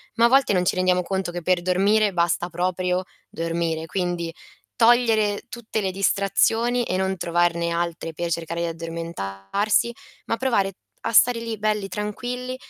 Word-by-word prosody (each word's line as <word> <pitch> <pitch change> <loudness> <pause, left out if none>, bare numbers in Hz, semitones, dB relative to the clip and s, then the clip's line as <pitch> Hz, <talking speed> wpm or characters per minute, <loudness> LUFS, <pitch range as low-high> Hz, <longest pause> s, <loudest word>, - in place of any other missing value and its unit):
Ma 230 - +4
a - - +7
volte 265 -3 +4
non 180 -1 +2
ci - - +2
rendiamo 185 0 +2
conto 190 -1 -2
che 175 - -5
per 175 +1 +1
dormire 200 +3 +3
basta 175 0 +1
proprio, 180 +1 -1 0.2
dormire. 165 -1 -2
Quindi, 175 -2 -2 0.4
togliere 225 -3 +3
tutte 230 -2 -4
le 190 - 0
distrazioni 210 +5 +2
e 185 - -2
non 190 0 0
trovarne 170 0 +1
altre 170 -1 -3
per 170 +2 -3
cercare 170 0 -3
di 170 - 0
addormentarsi, 165 - -2 0.3
ma 230 - -1
provare 200 -7 +1 0.3
a - - 0
stare 235 +1 +5
lì 230 -1 -4
belli 210 -1 0
tranquilli, 245 +5 -4
185 Hz, 155 wpm, -23 LUFS, 170-215 Hz, 0.4 s, a